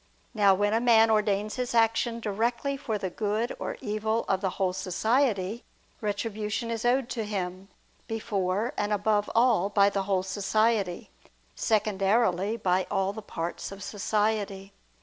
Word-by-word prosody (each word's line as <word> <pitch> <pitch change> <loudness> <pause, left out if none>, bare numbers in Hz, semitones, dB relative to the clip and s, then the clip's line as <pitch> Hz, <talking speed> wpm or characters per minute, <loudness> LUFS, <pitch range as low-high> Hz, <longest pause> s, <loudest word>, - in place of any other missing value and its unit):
Now 200 -4 +5
when 205 +2 +1
a 225 - +2
man 225 -2 +5
ordains 210 +1 +1
his 250 -1 -2
action 230 +1 +2
directly 235 +6 -1
for 235 -6 -3
the 190 -3 -4
good 215 +4 -1
or - - -4
evil 220 +2 -1
of 190 -1 +1
the 190 - 0
whole 185 -1 +1
society, 210 +3 0 0.4
retribution 210 +2 -2
is 225 -1 -3
owed 250 +1 +2
to 230 -4 -2
him, 190 -2 -4 0.4
before 210 -1 -1
and 205 0 -1
above 210 0 +1
all, 230 -5 +4
by 200 -1 +4
the 200 - 0
whole 190 -2 +2
society; 200 0 0 0.4
secondarily, 205 -1 +1
by 185 -3 +1
all 195 -1 0
the 220 - -7
parts 170 -4 -5
of 195 0 -8
society. 205 -1 -1
210 Hz, 150 wpm, -27 LUFS, 195-225 Hz, 0.4 s, Now